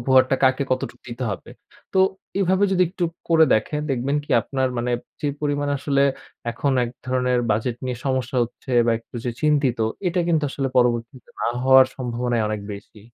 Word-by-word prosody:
উপহারটা 130 +1 +4
কাকে 130 +1 +3
কতটুক 130 - -3
দিতে 120 +1 -4
হবে? 100 - -6 0.4
তো 190 - +3 0.4
এভাবে 190 +1 +3
যদি 185 - +4
একটু 180 0 -2 0.2
করে 160 -1 +6
দেখেন 150 +7 -1
দেখবেন 135 +3 0
কি - - -15
আপনার 130 -1 -1
মানে 120 +1 -1 0.3
যে 145 - 0
পরিমাণ 145 -1 -1
আসলে 140 0 +1 0.5
এখন 135 +4 -1
এক 120 - -5 0.2
ধরনের 125 -1 +1
বাজেট 115 +3 0
নিয়ে 125 -2 -3
সমস্যা 130 -1 -1
হচ্ছে 125 +2 -6
বা 115 - +4
একটু 115 - -26
যে 120 - 0
চিন্তিত, 145 -5 +2 0.3
এটা 180 +1 0
কিন্তু 160 -3 +2
আসলে 135 -1 -2
পরবর্তীতে 120 0 0
না - - 0 0.2
হওয়ার 130 0 +7
সম্ভাবনাই 120 -2 -1
অনেক 105 -1 -2
বেশি। 100 +2 -11
130 Hz, 175 wpm, -23 LUFS, 120-145 Hz, 0.5 s, হওয়ার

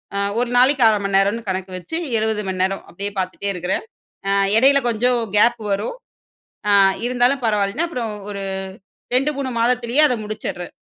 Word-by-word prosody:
அ - - 0 0.2
ஒரு 245 - -1
நாளைக்கு 260 0 +4
1/2 210 -2 +1
மண் 200 - 0
நேரம்னு 205 +3 +1
கணக்கு 185 0 -3
வச்சு 320 - -5 0.2
70 215 -1 -1
மண் 185 0 -2
நேரம் 195 +1 -2
அப்டீயே 200 +4 -3
பாத்துட்டே 185 +2 -3
இருக்குறேன். 180 - -2 0.4
அ - - +2 0.3
எடையில 275 +3 +5
கொஞ்சம் 240 +1 +2 0.2
கேப் 235 +2 +4
வரும். 210 - -2 0.7
அ - - +4 0.4
இருந்தாலும் 250 +1 +1
பரவாயில்லன்னு, 210 +10 0
அப்பறம் 230 -8 -4 0.2
ஒரு 200 -1 -5 0.7
2 275 +4 +2
3 265 -2 -2
மாதத்திலயே 245 +3 +2
அதை 250 -4 -1
முடிச்சுட்றேன். 210 -4 -5
225 Hz, 160 wpm, -20 LUFS, 200-250 Hz, 0.7 s, எடையில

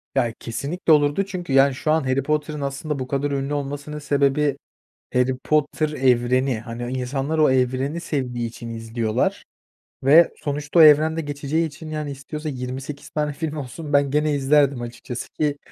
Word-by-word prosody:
Ya, 115 -1 +1
kesinlikle 155 +8 0
olurdu 145 +6 +3
çünkü, 180 -7 -5
yani, 135 0 +5
şu 155 +3 -1
an 160 -2 +2
Harry 130 +1 0
Potter'ın 150 0 -1
aslında 140 +1 -3
bu 130 - -4
kadar 140 +2 -1
ünlü 140 +1 -2
olmasının 145 +1 -4
sebebi, 145 0 +1 0.6
Harry 125 +1 +2
Potter 155 +3 0
evreni. 130 -3 +2
Hani, 120 +2 -5
insanlar 135 +5 -2
o 155 -3 +5
evreni 130 +4 0
sevdiği 125 -7 -2
için 115 0 -9
izliyorlar 115 -1 -2 0.6
ve 160 +5 +6
sonuçta 145 +3 -1
o - - +10
evrende 155 +1 +6
geçeceği 145 +2 -1
için, 155 +1 -10
yani, 150 -2 -4
istiyorsa 150 +3 -6
28 135 +2 -6
tane 150 -1 -2
film 155 +1 -4
olsun, 145 +2 -6
ben 140 -1 +3
gene 150 +1 +2
izlerdim 140 -2 +3
açıkçası, 120 +1 -6
ki 145 -2 +1
140 Hz, 160 wpm, -22 LUFS, 130-150 Hz, 0.6 s, o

